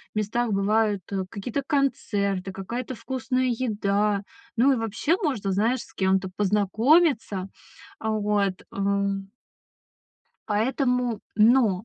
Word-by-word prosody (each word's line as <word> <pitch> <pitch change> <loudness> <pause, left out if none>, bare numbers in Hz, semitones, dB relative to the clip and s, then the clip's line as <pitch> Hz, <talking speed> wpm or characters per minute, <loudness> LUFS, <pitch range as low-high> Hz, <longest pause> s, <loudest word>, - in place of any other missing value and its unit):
местах 215 +2 0
бывают, 205 0 +2
э, 190 -1 -1
какие-то 225 +8 -3
концерты, 200 -9 0
какая-то 235 +7 -5
вкусная 255 +1 -2
еда. 210 -3 0 0.3
Ну, 270 +4 +5
и - - 0
вообще 225 - 0
можно, 240 - -1
знаешь, 225 +6 +1
с - - -14
кем-то 190 0 +1
познакомиться. 210 - +2 0.5
А, 220 - -1
вот, 205 -3 0
ам. 200 0 -1 1.2
Поэтому 245 +1 0
Но! 215 -3 +4
210 Hz, 105 wpm, -25 LUFS, 200-245 Hz, 1.2 s, Ну